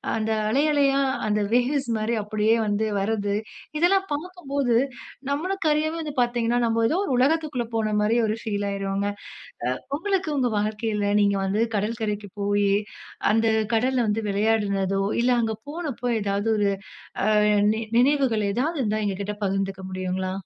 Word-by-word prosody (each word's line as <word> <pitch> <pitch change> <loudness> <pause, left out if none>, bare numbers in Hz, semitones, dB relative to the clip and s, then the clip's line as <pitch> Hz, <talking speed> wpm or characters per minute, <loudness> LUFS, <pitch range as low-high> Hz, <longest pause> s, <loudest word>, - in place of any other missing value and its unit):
அந்த 220 0 -1 0.2
அலை 275 +6 +2
அலையா, 275 -1 +3 0.3
அந்த 210 0 +1
வேவ்ஸ் 250 +1 +1
மாரி 220 +2 -1
அப்படியே 215 +2 +2
வந்து 210 +1 0
வர்றது, 205 0 -1 0.4
இதெல்லாம் 385 +3 +3
பாக்கும்போது, 285 -7 -1 0.5
நம்மளுக்கு 335 +5 -1
அறியாமயே 315 +2 -1
வந்து 295 -2 -5
பாத்தீங்கன்னா, 240 0 +1
நம்ம 230 0 +2
ஏதோ 330 - +1
ஒரு 270 - -1
உலகத்துக்குள்ள 285 -2 +1
போன 215 -1 0
மாரி 220 +3 +2
ஒரு 215 +1 -1
ஃபீல் 205 -3 -2
ஆயுறுவோங்க. 195 0 -2 0.6
அ - - +1 0.3
உங்களுக்கு 385 -2 -1
உங்க 255 -3 +1
வாழ்க்கையில 210 -1 -1
நீங்க 200 -1 +3
வந்து 200 +3 +1
கடல்கரைக்கு 210 -1 -2
போயி, 205 0 +2 0.6
அந்த 225 +1 +2 0.3
கடல்ல 255 +3 +2
வந்து 210 +2 +1
விளையாடுனதோ, 200 -2 +1 0.2
இல்ல 250 - +3
அங்க 220 -1 -1
போனப்போ 295 -6 -4 0.2
எதாவது 200 +2 -1
ஒரு 205 -1 +2 0.6
அ - - +2 0.5
நி 220 - -3 0.2
நினைவுகள் 250 -6 +2
எதாவது 300 +9 -1
இருந்தா 215 -1 0
எங்ககிட்ட 200 +1 -2
பகிந்துக்க 195 0 -2
முடியுங்களா? 185 0 -3
225 Hz, 145 wpm, -24 LUFS, 205-275 Hz, 0.6 s, அலையா